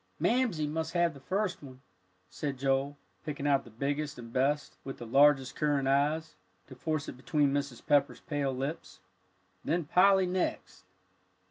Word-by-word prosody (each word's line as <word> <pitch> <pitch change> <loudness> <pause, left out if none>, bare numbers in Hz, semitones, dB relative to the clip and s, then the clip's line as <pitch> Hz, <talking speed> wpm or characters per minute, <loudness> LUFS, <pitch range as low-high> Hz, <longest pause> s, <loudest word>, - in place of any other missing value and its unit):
"Mamsie 235 -11 +1
must 160 +2 -3
have 175 -1 +2
the 140 - -12
first 190 +7 -2
one," 130 -3 -11 0.5
said 140 +8 -4
Joel, 135 +2 0 0.3
picking 145 -2 -5
out 140 -2 +3
the - - -12
biggest 140 +5 -3
and 115 -1 -10
best, 145 +3 0
with 135 - -6
the 120 - -8
largest 135 +2 +4
currant 145 -3 +1
eyes, 150 +4 +1 0.3
to - - -12
force 155 -3 -3
it - - -6
between 145 +1 +1
Mrs. 140 -4 -3
Pepper's 145 -1 +2
pale 145 -3 -1
lips, 130 - -5 0.6
"then 170 -1 0
Polly 190 +4 +5
next." 180 0 -3
145 Hz, 155 wpm, -30 LUFS, 135-160 Hz, 0.6 s, Polly